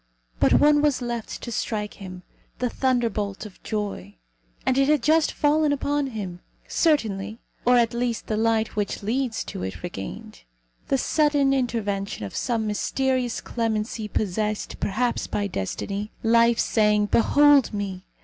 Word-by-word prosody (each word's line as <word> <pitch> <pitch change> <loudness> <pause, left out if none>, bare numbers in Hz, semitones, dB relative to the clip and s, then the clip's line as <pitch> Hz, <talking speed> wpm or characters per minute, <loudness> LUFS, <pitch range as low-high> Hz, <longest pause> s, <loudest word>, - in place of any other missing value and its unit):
But - - +4
one 295 0 +5
was 295 -4 +2
left 235 -2 -5
to 240 - -5
strike 210 -2 -2
him 185 -2 -9 0.3
the 250 -1 -1
thunderbolt 225 -6 -1
of 205 - -12
joy. 200 - -4 0.5
And 260 - +2
it 275 0 +3
had 300 -5 +3
just 315 +2 +3
fallen 300 0 +2
upon 285 0 0
him. 200 -8 -6 0.3
Certainty, 220 - +1 0.3
or 245 0 +5
at 235 -1 +2
least 235 -1 -2
the 215 - -2
light 225 0 +1
which 205 -1 -2
leads 240 +2 -1
to - - -7
it, 95 - -5
regained; 100 - -7 0.5
the 270 - +2
sudden 290 0 +2
intervention 205 - -2
of 100 - -8
some 230 -3 -1
mysterious 250 +3 -1
clemency 220 -1 -2
possessed, 210 +1 -2
perhaps, 235 +4 -1
by 205 - -1
destiny; 200 - -3
life 230 +1 +4
saying, 210 -2 +3
"Behold 285 +5 +5
me!" 200 -3 -4
225 Hz, 145 wpm, -24 LUFS, 205-260 Hz, 0.5 s, one